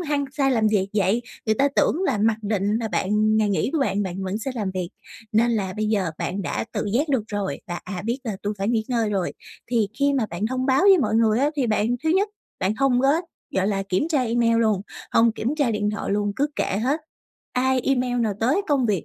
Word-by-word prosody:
hăng 295 -4 -1
say 275 -2 +1
làm 225 -4 +2
việc 200 -2 +1
vậy, 205 +4 +2 0.2
người 220 - +3
ta 280 +5 +3
tưởng 355 - +2
là 240 -7 +1
mặc 215 +1 +2
định 205 +1 0
là 225 - -2
bạn 195 - -1
ừm, 215 +1 +3
ngày 215 -1 +2
nghỉ 200 +6 0
của 320 - +1
bạn 205 -7 +1
bạn 190 0 -4
vẫn 190 +3 -2
sẽ 245 +4 -4
làm 205 -5 -2
việc. 180 -2 -2 0.4
Nên 230 +2 +3
là 200 -5 -1
bây 215 0 0
giờ 200 -6 +1
bạn 195 +2 -2
đã - - -2
tự - - -2
giác 290 +6 +1
được 265 -6 +1
rồi 205 -2 -3
và, 175 -1 -4
à, 180 -1 -5
biết 235 +4 -1
là 215 -4 -3
tui 205 +1 -2
phải 200 +2 -1
nghỉ 225 -2 +1
ngơi 230 -4 0
rồi, 190 -3 -1 0.4
thì 225 -4 +2
khi 280 0 +3
mà 255 -5 +1
bạn 180 +6 -2
thông 260 +2 -2
báo 265 +5 +3
với 390 -2 +7
mọi 250 - +1
người 225 -1 +3
á, 285 +3 +2
thì 260 -4 +1
bạn 220 +3 +1
thứ 315 - +2
nhất, 395 +4 +2 0.3
bạn 195 +3 0
hông 265 -1 +3
có, 270 - +3 0.5
gọi 190 0 +2
là, 195 -2 0
kiểm 195 - -1
tra 290 -6 +2
email 230 -1 +2
luôn, 215 -4 +2 0.3
hông 230 -1 +4
kiểm 245 +6 -2
tra 280 -6 +2
điện 210 -1 0
thoại 210 - -4
luôn, 205 0 0
cứ 285 - +2
kệ - - 0
hết. 285 +6 +1 0.5
Ai, 255 0 +2
email 250 -2 0
nào, 215 -3 0
tới 270 - +2
công 270 -4 +2
việc, 200 -6 0
225 Hz, 250 wpm, -23 LUFS, 205-260 Hz, 0.5 s, với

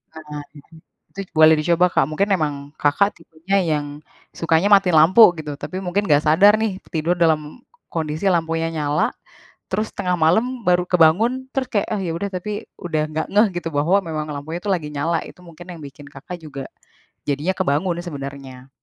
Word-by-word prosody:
Nah, 150 -2 -8 0.7
itu 195 - -7 0.2
boleh 160 0 +7
dicoba 170 +3 +3
Kak, - - +2
mungkin 175 +7 0
emang 145 -5 -2
Kakak 200 +8 +2
tipenya 165 +5 -3
yang 155 -5 -1 0.5
sukanya 165 +4 +1
matiin 195 -3 +5
lampu 180 +9 +7
gitu, 150 -2 -6
tapi 185 +5 -6
mungkin 195 +3 -1
nggak 145 -1 +4
sadar 185 +7 +6
nih, 215 -3 -2
tidur 165 0 -1
dalam 160 +3 0 0.3
kondisi 160 +3 -1
lampunya 165 -1 0
nyala. 150 -2 0 0.6
Terus, 215 +3 -1
tengah 180 -1 -1
malam 225 +11 +1
baru 180 0 +3
kebangun, 195 +10 +3
terus, 265 -2 -1
kayak, 205 -3 +1
"Ah, 205 - -2
ya 175 - -3
udah," 170 +5 -3
tapi, 205 +4 -5
udah 160 -3 -2
nggak 155 +1 -2
ngeh 210 +3 +5
gitu, 170 - -5
bahwa 160 +7 +3
memang 155 -2 -4
lampunya 150 +3 -5
itu - - -11
lagi 165 -5 -2
nyala, 160 +4 -1
itu - - -14
mungkin 170 0 -13
yang 170 - -10
bikin 145 0 -11
Kakak, 145 +6 -9
juga 140 -3 -7 0.6
jadinya 145 +6 -1
kebangun 170 0 0
sebenarnya. 135 -5 -8
165 Hz, 170 wpm, -21 LUFS, 150-190 Hz, 0.7 s, boleh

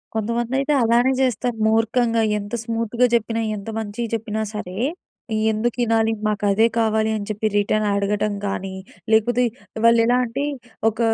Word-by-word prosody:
కొంతమందైతే 240 +6 0
అలానే 240 +3 +3
చేస్తారు. 245 -1 0
మూర్ఖంగా 225 +1 +2 0.2
ఎంత 205 +2 -8
స్మూత్‌గా 230 +1 0
చెప్పినా, 230 0 0
ఎంత 200 +2 -7
మంచిగా 220 +2 -4
చెప్పినా 220 -1 -3
సరే, 185 -3 -6 0.7
"ఎందుకు 220 +3 -1
ఇనాలి? 225 0 +2
మాకదే 210 +1 +2
కావాలి" 220 0 +1
అని 205 - -6
చెప్పి 215 +1 -1
రిటర్న్ 210 +1 +1
అడగటం 205 +1 0
గాని, 195 -1 -4 0.4
లేకపోతే 240 +3 +3 0.4
వాళ్లెలా 230 +1 +5
అంటే 260 +5 -3 0.5
ఒక 220 - -16
225 Hz, 130 wpm, -22 LUFS, 210-235 Hz, 0.7 s, వాళ్లెలా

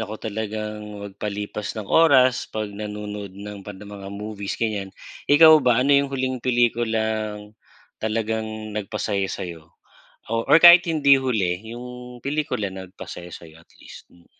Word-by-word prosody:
ako 110 0 -5
talagang 105 0 -5 0.2
magpalipas 105 +1 -5
ng 110 - -4
oras 130 -1 +4
'pag 110 0 -3
nanonood 105 -1 -6
ng 100 0 -8
mga 100 0 -9
movies 100 0 -6
ganyan, 105 -4 -2 0.4
ikaw 155 +1 +8
ba? 125 -1 +3
Ano 140 - +4
yung 140 0 +3
huling 130 -2 -2
pelikulang 110 -3 0 0.5
talagang 110 0 -3
nagpasaya 105 -1 -2
sa'yo? 85 -3 -7 0.6
O 115 0 -1
or - - +8
kahit 175 +1 +9
hindi 140 -4 +4
huli, 100 -9 0 0.2
yung 125 0 -9
pelikula 140 -9 -2
na 95 -1 -8
nagpasaya 90 -1 -9
sa'yo 80 -1 -12
at - - -24
least. - - -13
Mm. 85 -1 -23
110 Hz, 140 wpm, -23 LUFS, 100-125 Hz, 0.6 s, kahit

